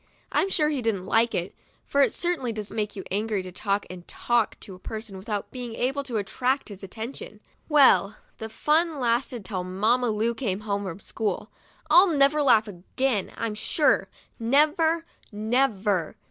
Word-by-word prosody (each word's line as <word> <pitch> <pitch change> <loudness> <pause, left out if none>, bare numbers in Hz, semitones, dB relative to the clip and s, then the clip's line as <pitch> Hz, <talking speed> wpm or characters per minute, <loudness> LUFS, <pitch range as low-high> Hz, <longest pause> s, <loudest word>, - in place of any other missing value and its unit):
I'm 390 - +1
sure 305 -5 +1
she 280 -4 -1
didn't 210 -5 -1
like 230 +3 +2
it, 175 +2 -2 0.3
for 280 - +2
it - - +4
certainly 345 -9 -2
does 215 -2 -6
make 210 -2 -3
you 195 - -6
angry 210 0 -1
to 185 - -8
talk 200 +2 -1
and 180 -1 -10
talk 240 -2 0
to 195 - -9
a 185 - -12
person, 220 0 -7
without 205 +2 -4
being 245 -3 -6
able 270 +4 -1
to 240 -4 -3
attract 250 +7 -1
his 200 -2 -10
attention. 220 +2 -7 0.3
Well, 265 -8 +5 0.2
the 220 - -5
fun 310 +5 +1
lasted 240 -2 0
till 185 -2 -3
Mamma 220 +7 +1
Lu 220 +2 0
came 210 -5 -3
home 200 -1 -2
from 190 +1 -6
school. 210 0 -3 0.4
I'll 370 +3 +7
never 295 -2 +3
laugh 225 -6 +4
again, 205 +4 -2
I'm 230 -2 -2
sure, 255 +8 +1 0.3
never, 310 +7 +3 0.3
never. 210 - 0
225 Hz, 170 wpm, -26 LUFS, 200-270 Hz, 0.4 s, I'll